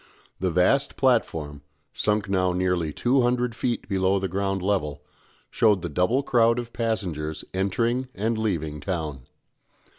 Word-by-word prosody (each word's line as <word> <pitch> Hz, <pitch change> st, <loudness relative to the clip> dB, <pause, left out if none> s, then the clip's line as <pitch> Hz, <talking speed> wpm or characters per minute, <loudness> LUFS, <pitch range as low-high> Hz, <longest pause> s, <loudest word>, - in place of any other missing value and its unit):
The 95 Hz, -, 0 dB
vast 90 Hz, -, +2 dB
platform, 80 Hz, -, +1 dB, 0.3 s
sunk 105 Hz, 0 st, 0 dB
now 95 Hz, -2 st, +1 dB
nearly 90 Hz, -3 st, 0 dB
two 130 Hz, -, +2 dB
hundred 125 Hz, 0 st, +1 dB
feet 120 Hz, -2 st, -2 dB
below 95 Hz, 0 st, +2 dB
the 95 Hz, 0 st, -1 dB
ground 95 Hz, 0 st, -2 dB
level, 75 Hz, -8 st, -1 dB, 0.5 s
showed 105 Hz, -5 st, +3 dB
the 85 Hz, -, -3 dB
double 90 Hz, -, +1 dB
crowd 115 Hz, -3 st, +3 dB
of 120 Hz, -1 st, -5 dB
passengers 90 Hz, -10 st, -2 dB
entering 115 Hz, +7 st, 0 dB
and 110 Hz, +3 st, 0 dB
leaving 85 Hz, -9 st, -2 dB
town. 75 Hz, -6 st, -4 dB
95 Hz, 140 wpm, -25 LUFS, 85-115 Hz, 0.5 s, showed